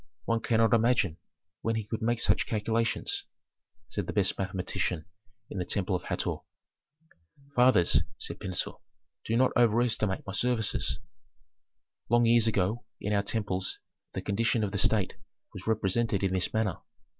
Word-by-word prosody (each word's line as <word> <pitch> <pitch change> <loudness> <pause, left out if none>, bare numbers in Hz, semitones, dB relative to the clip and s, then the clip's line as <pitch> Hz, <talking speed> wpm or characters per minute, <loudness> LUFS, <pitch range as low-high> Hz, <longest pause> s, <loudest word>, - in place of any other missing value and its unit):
One 115 0 +1
cannot 115 -1 +2
imagine 115 -7 +3 0.4
when 115 0 0
he 110 - -1
could 110 +2 -4
make 120 +1 +1
such - - +2
calculations," 115 - -1 0.6
said - - -4
the - - -3
best 100 -3 +3
mathematician 95 -3 -2 0.5
in 100 - -4
the - - 0
temple 95 +1 0
of 90 - -4
Hator. - - -2 1.2
"Fathers," 125 -8 +5 0.2
said - - -4
Pentuer, 95 -2 -3 0.5
"do 115 - +1
not 130 +1 +4
overestimate 115 -4 +2
my 95 - -5
services. 120 0 +1 1.1
Long 120 0 +4
years 115 -1 +5
ago 110 +2 0 0.2
in 105 - -2
our 100 - +3
temples 100 -3 -2 0.4
the - - -4
condition 115 +2 +1
of 100 - -1
the 100 - -1
state 105 -2 +2 0.4
was 95 -1 -9
represented 110 -1 +1
in 95 -1 +1
this 95 -1 +1
manner. 110 -4 0
110 Hz, 145 wpm, -29 LUFS, 95-115 Hz, 1.2 s, Fathers